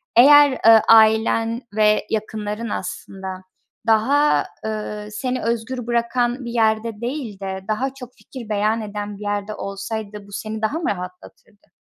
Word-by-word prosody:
Eğer, 285 +2 +7
ııı, 225 -1 +8
ailen 225 +1 +4
ve 210 -1 +3
yakınların 215 +1 -3
aslında 190 0 -6 0.4
daha, 270 +7 +3 0.2
ııı, 210 -1 -4
seni 250 +4 -3
özgür 235 +2 -3
bırakan 240 +1 0
bir 235 - -5
yerde 220 -1 0
değil 240 -5 -4
de 190 -1 -4
daha 255 +5 -1
çok 250 -2 -11
fikir 245 -5 -11
beyan 215 +2 +1
eden 205 -1 -6
bir - - -14
yerde 205 +1 -3
olsaydı 200 +1 -6
bu - - -15
seni 215 +2 -5
daha 220 +9 -1
mı 335 - -1
rahatlatırdı? 180 +2 -9
220 Hz, 140 wpm, -21 LUFS, 210-235 Hz, 0.4 s, ııı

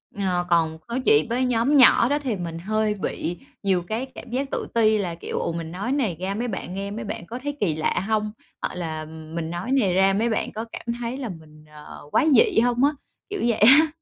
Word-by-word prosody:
Ờ, 185 -3 0
còn 165 -2 +2
nói 235 +2 -2
chuyện 145 +1 +5
với 250 +2 +1
nhóm 250 +4 +2
nhỏ 250 -2 +7
đó 290 +1 +1
thì 260 -7 -2
mình 170 -3 -5
hơi 215 +3 0
bị 175 -3 -3 0.3
nhiều 190 -3 +2
cái 220 +8 -3
cảm - - -9
giác 270 +3 -2
tự - - -2
ti 220 -2 +4
là, 180 -5 -2
kiểu, - - -4
"Ồ! - - -1
Mình 165 -1 -5
nói 200 +8 -3
này 255 - 0
ra 190 +2 -2
mấy 240 +3 -2
bạn 190 -4 -5
nghe 200 +1 -4
mấy 210 - -5
bạn 200 -4 -5
có 235 +7 -6
thấy 290 0 -3
kỳ 170 -7 +1
lạ 155 - 0
hông?", 215 -1 0 0.3
hoặc - - -3
là 160 -3 -4
"Mình 160 +1 -6
nói 175 +8 -4
này 220 -10 +3
ra 190 +1 +4
mấy 225 +4 +1
bạn 220 - -1
có 220 +2 -5
cảm - - -8
thấy 240 +2 -3
là 260 -4 -4
mình, 155 -3 -12
ờ, 150 0 -11
quái 315 - +3
dị 230 -3 +5
hông?" 245 +2 +2
á, 285 - +5 0.4
kiểu 405 -1 -4
vậy 235 -2 +1
á. 270 +9 +8
210 Hz, 240 wpm, -24 LUFS, 175-240 Hz, 0.4 s, á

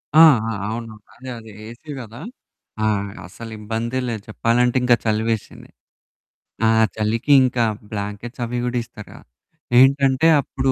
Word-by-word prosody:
ఆ! - - +8 0.3
ఆ! - - -2 0.2
అవును. 115 0 -5 0.2
అదే, 130 +1 -10
అదే. 110 -1 -13 0.2
ఏసీ 120 +7 -11
కదా! 115 0 -11 0.6
ఆ! - - +2 0.4
అసల 115 +6 -10
ఇబ్బందే 115 +4 -3
లేదు 110 -3 -4
చెప్పాలంటే 120 +3 +1
ఇంకా 125 -1 +5
చలివేసింది. 110 0 -2 1.0
ఆ - - +5 0.3
చలికింకా 120 +3 +3 0.3
బ్లాంకెట్స్ 105 +4 -6
అవి 120 +1 -4
కూడా 125 0 -1
ఇస్తారుగా 110 -3 -13 0.6
ఏంటంటే, 135 +2 +4
అప్పుడు 135 0 -1
115 Hz, 125 wpm, -21 LUFS, 110-125 Hz, 1.0 s, ఆ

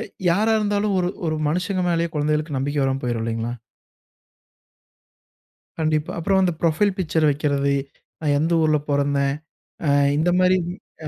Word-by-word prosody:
அ - - -3 0.3
யாரா 215 +6 +2
இருந்தாலும் 205 -1 0
ஒரு 180 -1 +1 0.2
ஒரு 155 -1 -1
மனுசங்க 180 +4 -1
மேலேயே 170 0 +1
கொழந்தைகளுக்கு 150 0 -1
நம்பிக்கை 145 +2 -1
வராம 135 0 0
போய்ரும் 120 -2 -2
இல்லைங்களா? 115 +1 -2 2.3
கண்டிப்பா. 155 -1 0
அப்புறம் 190 +3 +2
அந்த 180 -2 +2
புரொஃபைல் 175 +4 +2
பிக்சர் 160 -3 +1
வக்கிறது, 140 -1 0 0.5
நான் 145 -2 +1
எந்த 160 +3 0
ஊர்ல 155 -1 +3
பொறந்தேன்? 140 -1 +1 0.5
அ - - +2 0.3
இந்த 160 +3 +2
மாரி 185 0 +4
வி 175 - -4 0.3
அ, - - -2
155 Hz, 145 wpm, -22 LUFS, 140-180 Hz, 2.3 s, மாரி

